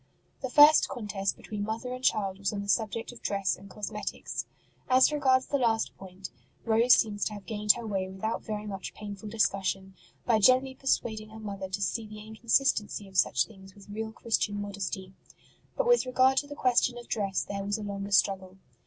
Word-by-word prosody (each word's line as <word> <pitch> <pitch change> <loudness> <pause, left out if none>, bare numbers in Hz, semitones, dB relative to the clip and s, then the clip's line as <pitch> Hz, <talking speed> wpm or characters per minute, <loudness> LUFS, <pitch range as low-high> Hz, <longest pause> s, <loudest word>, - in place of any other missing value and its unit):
The 260 - -3
first 295 +3 +7
contest 205 -5 -3
between 210 -1 -6
mother 225 +4 -3
and 255 0 -7
child 195 -5 +1
was 200 - -1
on 200 -1 -4
the - - -8
subject 220 +4 0
of 245 - -14
dress 195 -2 0
and 195 +1 -14
cosmetics. 210 +2 -5 0.4
As 260 +3 +6
regards 260 -3 +3
the 280 - -1
last 225 -3 +1
point, 190 -4 -10 0.3
Rose 230 +2 +6
seems 205 -3 0
to 215 - -2
have 205 -2 -9
gained 210 -2 +3
her 235 - -7
way 190 -3 -2
without 190 +4 -3
very 210 -1 -5
much 195 -2 -6
painful 205 0 -7
discussion, 195 -2 0 0.3
by 225 -3 +3
gently 255 +4 +4
persuading 220 -5 -1
her 220 0 -11
mother 200 -3 -6
to 190 +2 -3
sec 220 +3 -2
the 215 - -9
incon 220 +2 -11
sistency 210 -6 +2
of 190 - -16
such 130 -7 +3
things 195 -3 -15
with 200 0 -16
real 220 +2 -4
Christian 220 -2 -1
modesty; 195 -1 -5 0.6
but - - +1
with 485 - +4
regard 260 +1 +3
to 285 - +1
the 290 - -8
question 250 -2 +2
of 240 - -10
dress 200 -3 -1
there 200 0 -4
was 205 +2 -1
a 215 - -6
longer 200 -1 -5
struggle. 190 -1 +1
210 Hz, 195 wpm, -29 LUFS, 195-235 Hz, 0.6 s, first